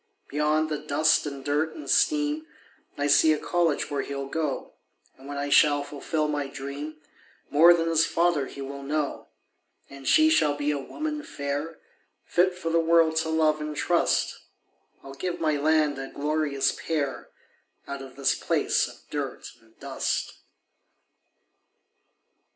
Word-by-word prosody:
Beyond 150 +2 +1
the 150 -1 -2
dust 155 +1 +2
and 140 -2 -7
dirt 150 +2 0
and 305 - -9
steam 300 0 +2 0.5
I 145 - -1
see 155 +2 +5
a - - -1
college 165 -3 0
where 140 -1 0
he'll 140 -1 -5
go; 150 0 -3 0.4
And 135 +1 -14
when 145 0 -5
I 145 0 -2
shall 145 0 +5
fulfill 150 +2 -2
my 145 -2 -2
dream, 140 +3 -7 0.5
More 170 +4 +7
than 165 -1 -1
his 165 -1 +3
father 165 -5 +1
he 140 - -9
will 140 +1 -6
know; 145 +1 -3 0.6
And 140 -1 -10
she 315 0 +5
shall 150 - +3
be 145 0 -1
a 145 - -2
woman 305 - -4
fair, 145 - -4 0.5
Fit 180 +1 +2
for 165 -3 -3
the 165 - +3
world 165 -1 +4
to 160 0 0
love 155 -1 +2
and 150 0 -4
trust 175 -1 +1 0.6
I'll 135 - -9
give 180 +5 -4
my 155 -2 +1
land 150 -1 +2
a 135 - -5
glorious 150 -1 0
pair 145 -4 -3 0.6
Out 140 0 -5
of 135 -1 -11
this 140 0 +2
place - - +1
of - - -15
dirt - - -4
and 110 0 -27
dust. - - -2
150 Hz, 155 wpm, -26 LUFS, 140-165 Hz, 0.6 s, More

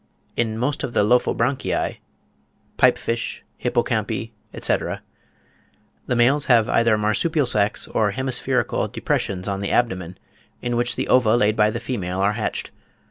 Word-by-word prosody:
In 110 -2 -1
most 135 +5 -1
of 120 - -3
the - - +4
Lophobranchii 125 +3 +1 0.8
(Pipe - - +5
fish, 115 0 -3 0.2
Hippocampi, - - -1 0.2
etc.) - - -1 1.0
the 125 - 0
males 135 +5 +4
have 115 -4 +4
either 115 -2 +3
marsupial 135 +9 +1
sacks 105 -4 0
or 105 -2 +1
hemispherical 130 +5 -1
depressions 95 -1 -2
on 100 -1 -2
the 100 - -2
abdomen, 95 -7 0 0.4
in 120 -1 -2
which 120 0 0
the - - -2
ova 120 -3 +4
laid 105 -2 +2
by 105 -1 +4
the 115 - -3
female 95 -7 -3
are 100 +2 +2
hatched. 110 0 -3
115 Hz, 140 wpm, -22 LUFS, 105-125 Hz, 1.0 s, Pipe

